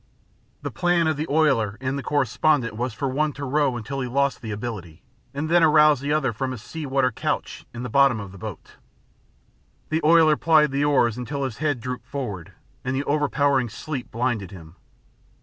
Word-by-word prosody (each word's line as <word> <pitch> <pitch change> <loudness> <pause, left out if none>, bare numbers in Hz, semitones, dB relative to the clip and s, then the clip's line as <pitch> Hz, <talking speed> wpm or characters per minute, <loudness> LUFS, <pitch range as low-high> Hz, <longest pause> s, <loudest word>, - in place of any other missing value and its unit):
The - - -3
plan 175 -1 +1
of 155 -1 +1
the 150 +2 -3
oiler 135 -9 +2
and 130 +1 -2
the 140 - -3
correspondent 135 -2 +1
was 125 +3 -2
for 135 +6 -3
one 145 +3 0
to 140 +2 -6
row 140 -2 +1
until 135 +4 -5
he 125 - -2
lost 140 +2 0
the 115 - -6
ability, 105 -7 -6 0.3
and 145 +3 -3
then 170 +2 +4
arouse 150 -3 +5
the 140 +2 -3
other 150 -6 +1
from 130 +4 -3
his 120 -3 -9
sea 160 +1 -6
water 130 -1 +1
couch - - -3
in 120 +1 -7
the - - -3
bottom 135 -1 +3
of 100 -2 -8
the 100 - -12
boat. 105 -3 -9 1.1
The 160 +1 0
oiler 160 -1 +5
plied 155 -3 +4
the 140 +1 0
oars 125 -6 +2
until 140 +3 -4
his 130 -5 -4
head 145 -4 0
drooped 125 0 -6
forward, 110 - -5 0.3
and 130 +1 -2
the 135 - -1
overpowering 145 -3 +1
sleep 135 +3 -6
blinded 115 -5 -2
him. 85 -3 -12
135 Hz, 195 wpm, -24 LUFS, 120-150 Hz, 1.1 s, arouse